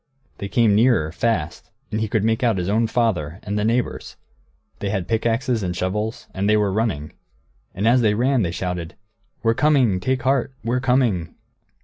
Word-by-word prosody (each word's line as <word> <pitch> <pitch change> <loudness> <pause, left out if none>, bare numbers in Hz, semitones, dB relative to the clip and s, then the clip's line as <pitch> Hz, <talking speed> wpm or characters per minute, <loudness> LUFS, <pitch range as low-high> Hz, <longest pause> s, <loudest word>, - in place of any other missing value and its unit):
They 100 - -5
came 115 -2 +3
nearer, 110 -8 +3
fast, 90 -4 -2 0.2
and 110 - -1
he 110 - 0
could 105 0 0
make 115 +3 +1
out 115 -5 +2
his 90 +1 -2
own 110 +2 +2
father, 95 -9 -1
and 100 - -3
the 105 - 0
neighbours. 115 +3 -1 0.6
They 100 - -2
had 95 -3 -2
pickaxes 115 +1 0
and 90 -2 -2
shovels, 105 +5 -2
and 100 +2 -1
they 105 - +4
were 105 -2 +1
running. 100 -9 -2 0.6
And 100 +4 0
as 125 +2 +5
they 105 -2 +2
ran 125 +2 +2
they 90 - 0
shouted, 90 -1 -4 0.5
"We're 115 0 +3
coming; 130 -8 +3
take 130 +5 -1
heart, 135 0 +1
we're 120 +3 0
coming!" 125 -10 +1
110 Hz, 185 wpm, -22 LUFS, 95-120 Hz, 0.6 s, as